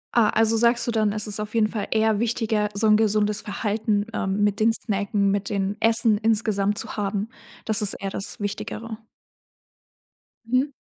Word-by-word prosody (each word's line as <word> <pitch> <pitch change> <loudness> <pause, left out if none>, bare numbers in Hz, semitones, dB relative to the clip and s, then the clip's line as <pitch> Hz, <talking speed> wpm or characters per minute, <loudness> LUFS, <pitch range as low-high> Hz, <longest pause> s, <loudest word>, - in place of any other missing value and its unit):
Ah, 225 -3 +4
also, 225 0 +2
sagst 235 +1 +2
du 240 - -1
dann, 215 -2 +1
es 210 0 0
ist 210 -1 +1
auf 210 +1 -6
jeden 215 -2 +2
Fall 215 -2 -4
eher 220 -1 +1
wichtiger, 220 -2 -1
so 220 +2 0
'n 215 0 +5
gesundes 210 -1 +1
Verhalten, 210 0 -2
ähm, 195 0 -1
mit 205 +1 0
dem 225 +1 +3
Snacken, 200 -2 -1
mit 200 0 -2
dem 200 -1 -2
Essen 225 -1 +3
insgesamt 210 -2 +1
zu - - -4
haben, 205 +1 -2 0.4
das 220 0 +4
ist 205 -1 +6
eher 195 -1 -5
das 195 - -1
Wichtigere. 215 +2 -6 1.5
Mhm. 260 +4 0
215 Hz, 175 wpm, -23 LUFS, 205-225 Hz, 1.5 s, ist